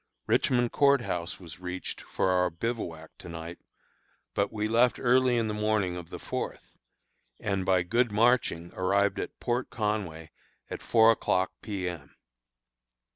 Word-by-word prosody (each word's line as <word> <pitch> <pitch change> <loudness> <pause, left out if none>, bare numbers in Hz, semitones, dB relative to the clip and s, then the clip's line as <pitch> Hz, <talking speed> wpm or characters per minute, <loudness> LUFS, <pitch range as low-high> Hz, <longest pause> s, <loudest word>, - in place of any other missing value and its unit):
Richmond 120 -2 +2
Court 140 -2 +4
House 90 -5 -3
was 90 -1 -10
reached 90 0 -5
for 95 - 0
our 90 0 +3
bivouac 85 -4 -4
to - - -10
night; 85 +1 -7 0.7
but 100 0 0
we 105 -1 -1
left 120 +2 +3
early 125 0 +4
in 115 -1 +1
the 105 - -2
morning 105 -4 0
of 85 -2 -8
the - - -6
fourth, - - -5 0.6
and 95 -2 -1
by 95 -2 +4
good 120 +5 +1
marching 105 -6 +2
arrived 100 +2 +1
at - - -5
Port 120 +1 -1
Conway 100 -8 -3 0.4
at - - -5
four 115 0 +5
o'clock 95 -4 +1
P. 100 -4 -3
M. 85 -5 -7
100 Hz, 150 wpm, -28 LUFS, 90-115 Hz, 0.7 s, four